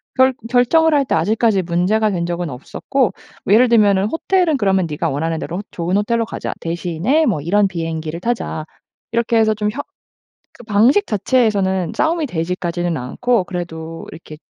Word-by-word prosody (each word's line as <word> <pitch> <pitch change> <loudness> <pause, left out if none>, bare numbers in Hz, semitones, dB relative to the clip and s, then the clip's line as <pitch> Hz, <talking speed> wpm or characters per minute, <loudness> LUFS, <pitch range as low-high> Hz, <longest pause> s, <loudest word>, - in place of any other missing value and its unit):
결 260 0 +4 0.2
결정을 310 +6 +3
할 280 -2 +3
때 - - 0
아직까지 210 +3 +2
문제가 185 +5 +1
된 170 -2 -2
적은 175 -2 -3
없었고 205 - -2 0.3
뭐 200 - +3
예를 245 +3 +5
들면은 205 -4 +4
"호텔은 325 - +1
그러면 195 -5 +2
니가 150 - -2
원하는 160 +3 -2
대로 180 +5 -5
좋은 175 +3 -1
호텔로 230 +2 0
가자. - - -5
대신에 175 - 0
뭐 185 - 0
이런 200 +6 +2
비행기를 165 -2 -4
타자." 225 -8 -3 0.5
이렇게 230 0 +1
해서 220 -1 +3
좀 210 0 -1
협 285 +5 -6 0.7
그 240 - -12
방식 230 - +3
자체에서는 200 -5 +1
싸움이 325 0 +1
되지까지는 175 - -2
않고 195 - 0
그래도 165 -3 -6
이렇게 155 -2 -11
200 Hz, 365 characters per minute, -18 LUFS, 170-235 Hz, 0.7 s, 예를